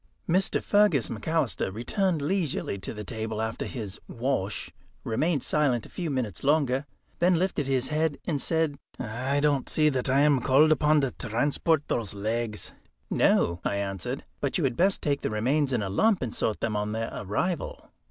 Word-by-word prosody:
Mr. 185 +3 +2
Fergus 205 - +3
McAlister 145 -4 -1
returned 160 - 0
leisurely 160 - -1
to - - -4
the 105 -1 -6
table 110 +1 -4
after 110 0 -2
his 105 -7 -6
"wash," 115 -5 -2 0.3
remained 145 +5 0
silent 140 -6 +1
a - - -12
few 175 -3 -4
minutes 125 - -3
longer, 140 -2 +2 0.3
then 180 +1 +4
lifted 170 -6 0
his 130 -2 +1
head 155 -1 0
and 150 -6 -1
said: 160 -4 0 0.2
"I 130 +4 -1
don't 145 -3 +1
see 155 -1 +3
that 130 -2 -1
I 135 +2 +4
am 145 -3 +4
called 145 +6 +5
upon 155 0 +4
to 135 -2 0
transport 140 +6 0
those 105 -4 -2
legs." 110 +1 -2 0.4
"No," 85 0 +3
I - - 0
answered; 95 -3 -3
"but - - 0
you - - 0
had - - +1
best 190 +6 +2
take 140 -2 0
the - - -1
remains 130 +7 +1
in 120 -5 0
a 95 - -3
lump 205 - +3
and 120 - -3
sort 110 - -1
them 110 -2 -1
on 105 0 -1
their 115 0 -3
arrival." 145 - -3
135 Hz, 180 wpm, -27 LUFS, 110-155 Hz, 0.4 s, called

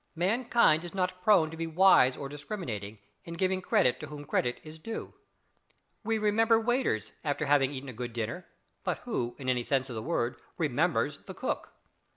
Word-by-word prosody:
Mankind 205 -2 +3
is 175 +2 -8
not 185 -1 -1
prone 180 -6 +5
to - - -7
be 165 0 -2
wise 160 -6 +5
or 140 - -5
discriminating, 135 - -6 0.3
in 170 - -7
giving 185 +1 0
credit 125 -7 +2
to 155 - -7
whom 145 0 -8
credit 125 -3 0
is 155 +1 -11
due. 225 +7 -6 0.9
We 225 +1 +1
"remember" 225 +2 +3
waiters 225 - 0
after 145 0 -1
having 140 -1 +3
eaten 140 0 -6
a - - -7
good 120 +1 -5
dinner, 115 +10 -4 0.4
but - - -1
who, 120 - -2
in 135 - -7
any 125 -1 +1
sense 135 0 0
of - - -5
the 110 - -3
word, - - -1 0.2
"remembers" - - +1
the - - -7
cook? - - -3
155 Hz, 185 wpm, -30 LUFS, 130-190 Hz, 0.9 s, prone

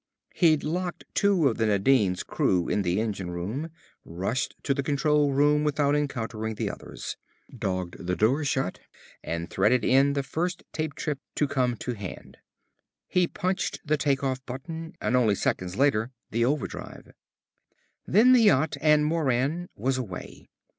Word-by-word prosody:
He'd 160 -4 +3
locked 175 +3 -3
two 195 -7 +3
of 115 - 0
the 110 -1 +1
Nadine's 100 -2 +2
crew 90 -2 +1
in 105 - +1
the 90 +1 0
engine 100 -5 -2
room, 105 - -4 0.3
rushed 95 +10 -3
to 140 - +1
the 140 - -1
control 145 +1 +2
room 145 +2 +3
without 145 -1 +2
encountering 115 -6 -2
the - - -2
others, - - -8 0.4
dogged 90 -2 -4
the 90 - +1
door 130 +10 +2
shut, 135 -8 -1 0.4
and 85 +1 -3
threaded 110 +6 +2
in 135 +2 +4
the 140 -1 -1
first 175 +5 -3
trip 155 -2 -3
tape 150 -3 -3 0.2
to 150 - +1
come 125 -4 0
to 125 - -4
hand. 100 -5 -8 0.7
He 180 -1 +3
punched 185 +2 -2
the 155 0 +2
take 140 -2 0
off 130 -1 -1
button 160 +6 -7
and 125 - 0
only 115 -5 +3
seconds 90 -1 -1
later 125 -3 +2 0.2
the 115 +2 +2
overdrive. 145 +2 -4 1.0
Then 235 +6 +6
the 250 - +6
yacht 160 -8 +3
and 150 -1 +4
Moran 155 +2 0
was 130 +4 0
away. 100 -8 -8
135 Hz, 155 wpm, -27 LUFS, 110-150 Hz, 1.0 s, Then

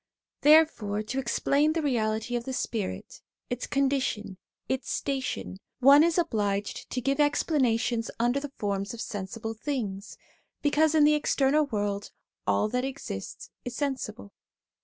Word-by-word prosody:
There 310 +2 +8
fore 210 -8 -4
to 250 +5 -3
explain 280 +4 +2
the 325 - 0
reality 225 -3 0
of 235 -1 -2
the 265 - -4
spirit, 220 -5 -4 0.3
its 245 0 -3
condition, 260 -8 0 0.3
its 265 0 -2
station, 270 -8 -3 0.2
one 280 +3 +8
is 335 0 +2
obliged 205 - -1
to 250 - -2
give 275 +3 0
explanations 255 -6 +1
under 240 +4 +2
the 285 -1 -7
forms 200 +2 -2
of - - -12
sensible 215 +2 -5
things, 220 -5 -4 0.5
because 305 +2 +3
in 305 - +6
the 300 +1 +6
external 295 0 +2
world 205 -4 -2 0.4
all 210 - +2
that 250 +3 -1
exists 265 - -6
is 245 -1 -5
sensible. 250 -7 -4
250 Hz, 140 wpm, -28 LUFS, 215-285 Hz, 0.5 s, There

